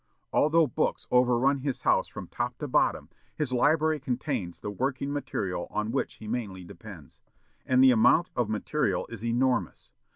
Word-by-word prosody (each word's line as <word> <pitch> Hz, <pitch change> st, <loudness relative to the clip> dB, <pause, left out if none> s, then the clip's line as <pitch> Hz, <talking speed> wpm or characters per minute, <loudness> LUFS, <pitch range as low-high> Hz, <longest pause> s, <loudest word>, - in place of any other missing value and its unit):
Although 160 Hz, +2 st, +4 dB
books 125 Hz, -, -2 dB
overrun 125 Hz, +2 st, +3 dB
his 135 Hz, -1 st, -3 dB
house -, -, +2 dB
from -, -, -8 dB
top -, -, -4 dB
to -, -, -5 dB
bottom, -, -, +1 dB, 0.3 s
his 140 Hz, -4 st, -2 dB
library 155 Hz, +4 st, +2 dB
contains 125 Hz, -, -3 dB
the 105 Hz, -, -6 dB
working 135 Hz, +5 st, -2 dB
material 95 Hz, -11 st, -3 dB
on 105 Hz, +1 st, -2 dB
which 135 Hz, -, -2 dB
he 110 Hz, -, -11 dB
mainly 105 Hz, -6 st, -4 dB
depends. 90 Hz, -, -12 dB, 0.5 s
And 130 Hz, 0 st, +4 dB
the 130 Hz, -, +8 dB
amount 125 Hz, +10 st, +4 dB
of 120 Hz, -4 st, 0 dB
material 110 Hz, -2 st, -1 dB
is 115 Hz, -1 st, -8 dB
enormous. 120 Hz, -, -1 dB
125 Hz, 160 wpm, -28 LUFS, 105-140 Hz, 0.5 s, the